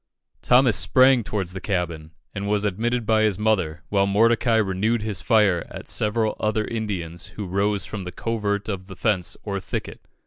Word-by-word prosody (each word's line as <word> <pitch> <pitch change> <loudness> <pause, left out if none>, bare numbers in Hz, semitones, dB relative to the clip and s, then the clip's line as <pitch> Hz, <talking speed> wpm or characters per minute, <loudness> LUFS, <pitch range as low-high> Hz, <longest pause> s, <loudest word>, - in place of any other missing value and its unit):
Thomas 125 -4 +4
sprang 130 -2 +5
towards 95 -4 -3
the 95 - -6
cabin, 85 -5 -3 0.2
and 100 0 -4
was 105 0 0
admitted 115 +4 -1
by 110 0 +3
his 105 -4 +2
mother, 95 -8 0
while 100 -1 +2
Mordecai 115 +3 +3
renewed 110 +2 +1
his 105 -4 -3
fire 105 -7 +3
at - - -9
several 110 +1 0
other 110 0 0
Indians 95 -7 -4
who 105 - -4
rose 100 +2 0
from 100 -3 -6
the 90 - -6
covert 105 0 -2
of 95 -3 -4
the 95 - -9
fence, 100 -3 -1
or 100 -2 -3
thicket. - - -6
105 Hz, 175 wpm, -23 LUFS, 95-110 Hz, 0.2 s, sprang